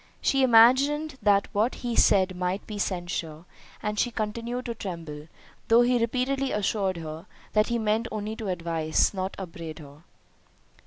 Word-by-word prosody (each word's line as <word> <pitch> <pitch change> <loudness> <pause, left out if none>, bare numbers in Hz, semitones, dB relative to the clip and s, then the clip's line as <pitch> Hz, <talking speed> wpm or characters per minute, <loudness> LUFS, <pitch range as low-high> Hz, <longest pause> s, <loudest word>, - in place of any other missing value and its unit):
She 270 - +1
imagined 265 +5 +4
that 200 -1 +3
what 220 +4 +1
he 240 -1 -1
said 190 -3 +4
might 180 +2 -2
be 210 -2 -6
censure, 175 -4 -3 0.4
and 210 0 -2
she 245 - +2
continued 235 +3 -4
to 235 - -3
tremble, 165 -8 -7 0.4
though 230 +1 +6
he 245 0 +2
repeatedly 260 +3 0
assured 195 -2 0
her, 160 +2 -7 0.3
that 215 0 +3
he 235 - 0
meant 220 +1 0
only 215 0 -4
to 220 - -5
advise, 165 -3 0
not 190 0 -3
upbraid 165 -4 -7
her. 145 -1 -13
210 Hz, 155 wpm, -26 LUFS, 175-235 Hz, 0.4 s, though